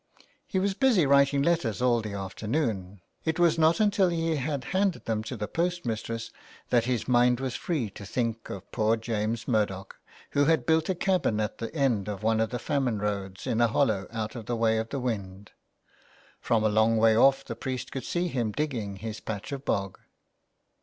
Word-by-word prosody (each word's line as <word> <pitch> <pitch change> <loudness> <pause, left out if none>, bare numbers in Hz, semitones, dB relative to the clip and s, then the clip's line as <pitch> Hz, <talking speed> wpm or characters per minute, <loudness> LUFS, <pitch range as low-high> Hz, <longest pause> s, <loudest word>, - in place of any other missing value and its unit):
He 195 - -2
was 195 +1 +1
busy 225 - +3
writing 140 0 +4
letters 155 -10 +1
all 120 -2 +3
the 105 -2 -5
afternoon; 100 - -3 0.2
it 160 0 -1
was 170 -2 +3
not 160 +1 +4
until 205 -3 +3
he 165 -1 0
had 140 -1 -2
handed 190 -1 +1
them 110 -1 -1
to 125 - -5
the 105 - -3
post 175 0 -1
mistress 115 0 -3 0.4
that 120 -2 +3
his 125 -2 -1
mind 125 0 +4
was 130 -2 -3
free 135 - -2
to 100 - -10
think 115 +2 -3
of - - -8
poor 110 0 +2
James 110 0 -2
Murdoch, 105 -5 -1 0.3
who 145 0 +3
had 160 +1 +2
built 160 +1 +2
a 190 - +1
cabin 175 - +1
at 105 -1 -2
the 115 - -4
end 125 -9 +1
of 105 0 -5
one 110 0 +2
of 110 -1 +1
the 125 - -3
famine 130 -3 0
roads 100 -2 -3
in 115 - 0
a 120 - +5
hollow 110 -5 +1
out 110 -1 -4
of 115 -3 -7
the 120 - -1
way 110 -1 +2
of 115 0 -4
the 140 - -3
wind. 100 -5 -4 0.9
From 110 -2 +1
a - - +4
long 110 +2 +3
way 110 0 +5
off 135 +3 +4
the 115 - -5
priest 130 +2 -4
could 135 - -4
see 175 +1 -1
him 120 -9 -1
digging 115 -7 -3
his 110 +2 -6
patch 105 +2 -6
of 140 0 -5
bog. 100 -1 -1
115 Hz, 200 wpm, -27 LUFS, 110-145 Hz, 0.9 s, a